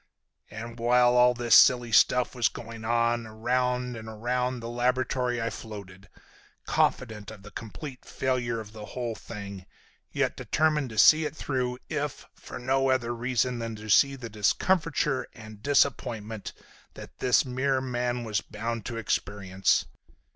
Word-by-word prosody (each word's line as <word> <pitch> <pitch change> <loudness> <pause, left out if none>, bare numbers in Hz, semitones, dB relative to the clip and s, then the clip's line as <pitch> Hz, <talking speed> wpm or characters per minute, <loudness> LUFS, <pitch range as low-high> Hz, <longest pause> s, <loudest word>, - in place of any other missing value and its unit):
And 115 +2 -8
while 120 +1 +4
all 125 0 +5
this 120 -2 +4
silly 120 -2 +6
stuff 125 +3 +4
was 120 -3 +2
going 115 -1 -8
on, 115 0 +1
around 125 +2 -1
and 110 -1 -8
around 125 +3 -2
the 115 - -7
laboratory 125 0 0
I 115 0 -2
floated, 100 -3 -10 0.6
confident 110 -5 0
of 105 -3 -11
the 105 - -11
complete 115 +6 -8
failure 120 -3 -1
of 110 -1 -9
the 105 -1 -8
whole 120 -2 -2
thing, 100 -4 -9 0.4
yet - - 0
determined 150 -3 +1
to 110 - -9
see 155 +8 +7
it 150 - -4
through 125 -4 -2
if 150 -2 -3
for - - -10
no 135 +2 +1
other 120 -2 +1
reason 125 0 -1
than 115 -1 -4
to 105 0 -5
see 140 +6 +5
the 125 -3 -7
discomfiture 145 - +1
and 110 -2 -12
disappointment 115 -6 0 0.4
that - - -12
this 125 -1 +3
mere 130 +1 0
man 125 -1 -2
was 110 -3 -1
bound 115 +1 -5
to 115 - -4
experience. 95 -3 0
120 Hz, 150 wpm, -27 LUFS, 110-125 Hz, 0.6 s, see